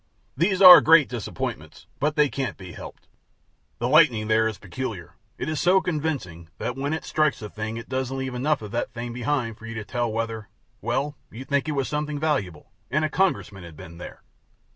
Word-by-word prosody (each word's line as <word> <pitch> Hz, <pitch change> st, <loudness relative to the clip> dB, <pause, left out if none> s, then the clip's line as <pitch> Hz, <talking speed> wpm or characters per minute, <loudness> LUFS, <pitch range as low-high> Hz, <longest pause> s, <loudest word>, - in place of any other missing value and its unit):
These 185 Hz, +6 st, +2 dB
are 180 Hz, -1 st, +12 dB
great 160 Hz, -3 st, +6 dB
disappointments; 120 Hz, -4 st, -6 dB
but 150 Hz, +2 st, 0 dB
they 150 Hz, -2 st, +4 dB
can't 135 Hz, -2 st, -4 dB
be 95 Hz, -2 st, -10 dB
helped. -, -, -11 dB, 0.7 s
The 120 Hz, -, -1 dB
lightning 125 Hz, -7 st, +4 dB
there 110 Hz, 0 st, +3 dB
is 110 Hz, -3 st, -4 dB
peculiar; 100 Hz, -4 st, -6 dB, 0.2 s
it -, -, -4 dB
is 155 Hz, -1 st, -2 dB
so 185 Hz, +2 st, +5 dB
convincing, 145 Hz, -, -3 dB
that 125 Hz, -, -3 dB
when 140 Hz, +2 st, -3 dB
it 160 Hz, -, -3 dB
strikes 155 Hz, -2 st, +1 dB
a 105 Hz, -, -7 dB
thing 110 Hz, +1 st, -5 dB
it 115 Hz, -, -8 dB
doesn't 130 Hz, 0 st, -3 dB
leave 130 Hz, -1 st, -4 dB
enough 140 Hz, +1 st, 0 dB
of 105 Hz, -, -8 dB
that 120 Hz, +1 st, -2 dB
thing 120 Hz, +1 st, -6 dB
behind 120 Hz, -2 st, -2 dB
for 115 Hz, -, -10 dB
you 115 Hz, -, -7 dB
to 110 Hz, -1 st, -5 dB
tell 120 Hz, 0 st, -2 dB
whether 110 Hz, -1 st, -4 dB, 0.3 s
Well, 145 Hz, +2 st, -2 dB
you'd 130 Hz, +4 st, -10 dB
think 140 Hz, +1 st, 0 dB
it -, -, -1 dB
was 135 Hz, -2 st, -1 dB
something 150 Hz, 0 st, -3 dB
valuable, 120 Hz, -, -2 dB, 0.2 s
and 155 Hz, +2 st, +1 dB
a -, -, -1 dB
Congressman 150 Hz, -, -1 dB
had 85 Hz, -3 st, -12 dB
been 85 Hz, -2 st, -11 dB
there. -, -, -10 dB
130 Hz, 205 wpm, -24 LUFS, 110-150 Hz, 0.7 s, are